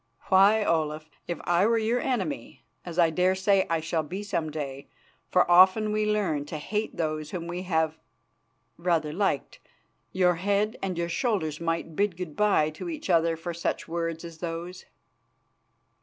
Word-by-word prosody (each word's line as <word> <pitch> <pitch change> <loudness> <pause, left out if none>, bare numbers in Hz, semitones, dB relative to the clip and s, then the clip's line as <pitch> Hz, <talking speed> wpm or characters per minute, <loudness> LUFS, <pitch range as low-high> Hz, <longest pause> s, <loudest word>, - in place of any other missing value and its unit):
Why, 205 +3 +5
Olaf, 155 -1 -1 0.2
if 170 -3 -3
I 175 +4 +3
were 230 0 +3
your 225 +2 +1
enemy, 190 - -3 0.2
as 175 -1 -8
I 170 -2 +4
dare 180 +3 +2
say 190 0 +2
I 165 -1 +1
shall 165 0 -1
be 185 +7 -6
some 180 -6 -2
day, 140 -3 -6 0.4
for 180 - +4
often 190 +4 +6
we 215 0 0
learn 165 -9 0
to 155 - -5
hate 210 +8 -3
those 155 -2 -2
whom 170 -1 -5
we 175 +1 -4
have 160 -2 0 0.8
rather 165 -3 0
liked, 190 -6 -1 0.5
your 180 -2 +2
head 205 +4 0
and 185 -3 -3
your 170 0 -1
shoulders 170 - -1
might 165 -1 -2
bid 200 -2 0
good 175 -5 -6
bye 200 -8 +3
to 155 - -7
each 310 - -3
other 165 -1 +3
for 170 +2 -5
such 170 - -3
words 165 0 -3
as 165 -1 -10
those." 175 +2 -6
170 Hz, 170 wpm, -27 LUFS, 160-195 Hz, 0.8 s, often